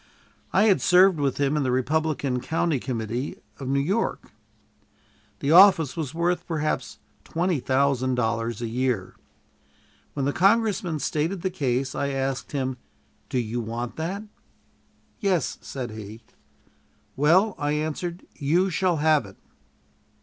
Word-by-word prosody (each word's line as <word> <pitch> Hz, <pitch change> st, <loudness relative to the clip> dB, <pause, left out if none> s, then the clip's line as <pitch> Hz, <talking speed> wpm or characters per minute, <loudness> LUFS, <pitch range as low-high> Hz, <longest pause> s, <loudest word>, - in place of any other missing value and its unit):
I 195 Hz, -, +4 dB
had 210 Hz, -4 st, +4 dB
served 180 Hz, -2 st, +5 dB
with 140 Hz, -2 st, 0 dB
him 140 Hz, +1 st, +1 dB
in 150 Hz, -, +1 dB
the 130 Hz, -, 0 dB
Republican 140 Hz, 0 st, 0 dB
county 160 Hz, -1 st, 0 dB
committee 120 Hz, +1 st, -4 dB, 0.2 s
of 135 Hz, -, -6 dB
New 140 Hz, +1 st, +1 dB
York. 195 Hz, +11 st, -1 dB, 1.1 s
The 140 Hz, -, +1 dB
office 170 Hz, -5 st, +7 dB
was 155 Hz, -6 st, -3 dB
worth 175 Hz, +2 st, -1 dB
perhaps 155 Hz, -2 st, -2 dB, 0.3 s
twenty 170 Hz, -2 st, -1 dB
thousand 130 Hz, -1 st, +1 dB
dollars 115 Hz, -1 st, -1 dB
a -, -, -1 dB
year. 120 Hz, -5 st, -1 dB, 1.0 s
When 140 Hz, -2 st, -2 dB
the 140 Hz, -, 0 dB
congressman 195 Hz, -4 st, +2 dB
stated 160 Hz, +5 st, -2 dB
the 190 Hz, -, 0 dB
case, 130 Hz, -6 st, -1 dB
I 140 Hz, -, -1 dB
asked 135 Hz, -1 st, -2 dB
him, 130 Hz, -2 st, -2 dB, 0.5 s
"Do -, -, -1 dB
you 120 Hz, 0 st, -2 dB
want 115 Hz, +2 st, -5 dB
that?" 185 Hz, +6 st, -3 dB, 1.0 s
"Yes," 190 Hz, -, 0 dB
said 125 Hz, -4 st, -6 dB
he. 110 Hz, +1 st, -9 dB, 0.9 s
"Well," 180 Hz, +9 st, +4 dB
I 145 Hz, 0 st, 0 dB
answered, 155 Hz, +4 st, -3 dB
"you 170 Hz, +6 st, +1 dB
shall 175 Hz, -1 st, +1 dB
have 150 Hz, -6 st, +3 dB
it." 95 Hz, -, -15 dB
145 Hz, 135 wpm, -25 LUFS, 130-175 Hz, 1.1 s, office